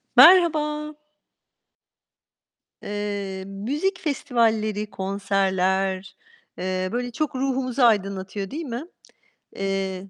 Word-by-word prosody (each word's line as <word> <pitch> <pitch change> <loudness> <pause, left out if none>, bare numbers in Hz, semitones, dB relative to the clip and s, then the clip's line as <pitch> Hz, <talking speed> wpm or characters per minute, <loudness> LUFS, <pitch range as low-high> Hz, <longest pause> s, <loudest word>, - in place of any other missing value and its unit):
Merhaba. 305 -4 +6 1.9
Eee, 205 -2 -4
müzik 285 - -2
festivalleri, 220 - 0
konserler, 190 -1 0 0.4
eee, 185 0 -2
böyle 245 +1 -2
çok 295 +3 -2
ruhumuzu 260 -1 -1
aydınlatıyor, 195 -3 +1
değil 315 +4 -4
mi? 245 +3 -5 0.7
Eee, 195 -1 -3
210 Hz, 75 wpm, -24 LUFS, 195-265 Hz, 1.9 s, Merhaba